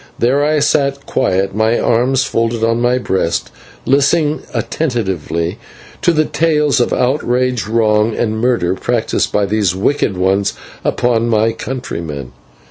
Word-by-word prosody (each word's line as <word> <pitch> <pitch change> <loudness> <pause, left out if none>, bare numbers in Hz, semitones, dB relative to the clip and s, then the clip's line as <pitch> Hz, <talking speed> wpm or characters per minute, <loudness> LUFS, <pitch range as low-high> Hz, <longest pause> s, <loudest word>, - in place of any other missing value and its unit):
There 135 +4 +2
I 155 +1 +2
sat 140 -2 +1
quiet, 95 +1 0
my 110 +3 +2
arms 125 +3 +2
folded 115 0 -1
on 115 +1 +1
my 125 +1 +2
breast, 95 -8 -1 0.3
listening 145 +3 +2
attentively 95 - -2 0.4
to - - +3
the 155 -2 +2
tales 150 -4 +1
of 120 - +1
outrage, 125 -3 0
wrong, 110 -1 +2
and 110 -1 -1
murder 115 -7 +1
practised 115 +4 -1
by 105 - +1
these 100 -3 0
wicked 100 -1 0
ones 95 +2 +1 0.3
upon 120 -1 +1
my 110 0 +2
countrymen. 85 - -6
115 Hz, 130 wpm, -16 LUFS, 100-135 Hz, 0.4 s, to